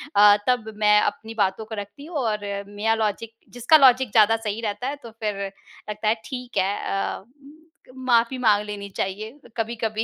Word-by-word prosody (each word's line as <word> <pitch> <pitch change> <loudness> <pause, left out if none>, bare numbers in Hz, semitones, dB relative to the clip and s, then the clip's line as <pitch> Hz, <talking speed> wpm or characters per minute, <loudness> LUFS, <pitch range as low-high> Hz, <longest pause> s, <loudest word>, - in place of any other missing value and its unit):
अ, 205 0 +7
तब 230 -3 0
मैं 210 0 +5
अपनी 225 -5 -3
बातों 190 +3 -2
को 220 - -7
रखती 205 +8 -8
हूँ 330 -1 -5
और 220 -6 0 0.3
मेरा 205 +2 0
लॉजिक 220 +1 -2 0.2
जिसका 245 +6 +5
लॉजिक 260 -4 +5
ज़्यादा 220 +1 +5
सही 220 0 -4
रहता 215 +2 -3
है 280 - -2
तो 230 - -9
फिर 210 -2 -2 0.5
लगता 210 +1 -3
है 215 - +4
ठीक 250 +1 -7
है, 195 +2 +1 0.4
अ, - - -19 0.7
माफ़ी 250 -1 +2
माँग 215 -5 +3
लेनी 205 -1 -6
चाहिए 205 +3 -3 0.3
कभी-कभी, 225 -1 -2
220 Hz, 175 wpm, -23 LUFS, 210-240 Hz, 0.7 s, अ